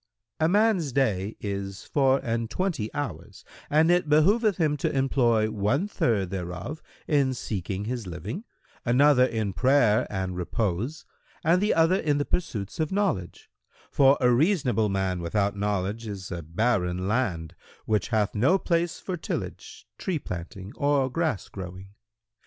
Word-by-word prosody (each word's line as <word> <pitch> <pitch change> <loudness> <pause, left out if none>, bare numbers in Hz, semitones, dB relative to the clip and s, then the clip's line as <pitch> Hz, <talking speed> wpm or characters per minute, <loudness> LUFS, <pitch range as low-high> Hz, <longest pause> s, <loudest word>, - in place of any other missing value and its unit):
"—"A 160 +1 +3
man's 200 -6 +2
day 110 -6 0
is 100 -1 -5
four 135 -1 +2
and 115 -2 -2
twenty 170 - -2
hours, 145 -1 -6 0.2
and 160 +3 +4
it 175 -3 +2
behoveth 200 +7 +4
him 155 -3 +2
to - - -1
employ 120 -5 +2
one 110 - 0
third 105 - 0
thereof 90 - -5 0.3
in 140 -3 +2
seeking 100 -3 -4
his 120 -3 -4
living, 100 - -6 0.4
another 130 +2 +5
in 110 -5 -2
prayer 125 -3 +3
and 95 -2 -3
repose 100 - -2 0.4
and 170 +4 +3
the 210 - +2
other 165 +3 +4
in 150 -6 +1
the 145 - 0
pursuits 110 - -3
of 155 -1 0
knowledge;[FN#108] 190 - -4
for 135 0 +6
a 125 -2 +4
reasonable 125 - +2
man 95 -2 -1
without 100 +4 0
knowledge 105 +2 -2
is 95 -3 -6
a 85 -2 -4
barren 90 +1 0
land, 95 -8 -1 0.3
which 105 -1 0
hath 110 -4 0
no 130 - +3
place 170 -2 0
for 185 - -4
tillage, - - -6
tree 185 -4 -1
planting 90 - -7
or 140 -2 +2
grass 160 - -1
growing. 95 0 -8
120 Hz, 145 wpm, -26 LUFS, 100-150 Hz, 0.4 s, for